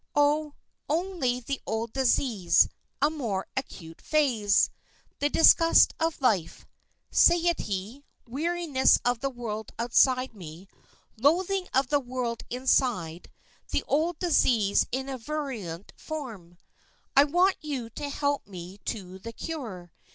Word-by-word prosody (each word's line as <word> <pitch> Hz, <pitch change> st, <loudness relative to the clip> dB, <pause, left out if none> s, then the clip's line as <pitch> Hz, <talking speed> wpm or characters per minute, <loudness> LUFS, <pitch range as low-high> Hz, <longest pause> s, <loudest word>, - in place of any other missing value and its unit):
"Oh, 290 Hz, +1 st, +2 dB, 0.3 s
only 320 Hz, -6 st, -1 dB
the 275 Hz, +3 st, -4 dB
old 220 Hz, +1 st, -3 dB
disease 245 Hz, -7 st, +3 dB
in -, -, -10 dB, 0.3 s
a 290 Hz, -, +5 dB
more 225 Hz, -11 st, -3 dB
acute 165 Hz, -11 st, -7 dB
phase. 240 Hz, -10 st, +2 dB, 0.5 s
The 290 Hz, -, +1 dB
disgust 330 Hz, +1 st, +6 dB
of 325 Hz, 0 st, -1 dB
life 200 Hz, -10 st, 0 dB, 0.5 s
satiety, 285 Hz, -, +2 dB, 0.2 s
weariness 310 Hz, +1 st, +2 dB
of 245 Hz, -1 st, +1 dB
the 275 Hz, -, -1 dB
world 220 Hz, -4 st, -6 dB
outside 255 Hz, +2 st, +2 dB
me, 175 Hz, -2 st, -11 dB, 0.5 s
loathing 360 Hz, -, +1 dB
of 265 Hz, -1 st, +1 dB
the 290 Hz, -, +3 dB
world 245 Hz, -3 st, -4 dB
inside; 240 Hz, -10 st, 0 dB, 0.4 s
the -, -, -1 dB
old 320 Hz, +3 st, 0 dB
disease 235 Hz, -, +2 dB
in 265 Hz, +2 st, -2 dB
a 265 Hz, -2 st, -5 dB
virulent 225 Hz, -, -5 dB
form. 225 Hz, -, -8 dB, 0.6 s
I 275 Hz, -, +8 dB
want 360 Hz, +6 st, +2 dB
you 265 Hz, -7 st, -5 dB
to 285 Hz, +6 st, -5 dB
help 285 Hz, -2 st, -1 dB
me 185 Hz, 0 st, -10 dB
to 190 Hz, -4 st, -5 dB
the 230 Hz, +4 st, -8 dB
cure. 220 Hz, -, -7 dB
255 Hz, 125 wpm, -27 LUFS, 210-295 Hz, 0.6 s, I